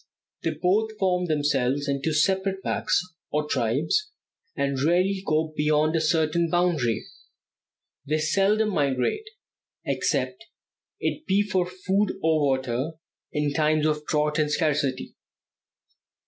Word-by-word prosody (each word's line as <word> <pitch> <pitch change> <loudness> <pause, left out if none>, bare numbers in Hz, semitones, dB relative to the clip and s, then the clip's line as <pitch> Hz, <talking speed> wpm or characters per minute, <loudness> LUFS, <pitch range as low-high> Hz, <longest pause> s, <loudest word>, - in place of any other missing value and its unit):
They 160 -1 -2
both 215 +5 +1
form 180 -2 +1
themselves 145 -2 0
into 140 +2 -1
separate 190 +5 +1
packs, - - +1 0.3
or 150 0 -1
tribes, 150 - 0 0.5
and 140 -2 -1
rarely 185 +5 +2
go 155 -3 0
beyond 150 +1 +2
a 165 - +2
certain 160 +1 +1
boundary. 160 -10 +1 1.0
They 155 +2 +1
seldom 195 +7 +2
migrate, 145 - 0 0.6
except - - -1 0.5
it 310 - -3
be 200 +2 +3
for 185 -3 0
food 190 +3 -1
or 160 -1 +3
water 130 +1 0 0.4
in 150 -1 -1
times 155 0 +2
of 150 -1 0
drought 150 0 +1
and 150 -1 +2
scarcity. 145 -4 0
155 Hz, 120 wpm, -25 LUFS, 145-185 Hz, 1.0 s, be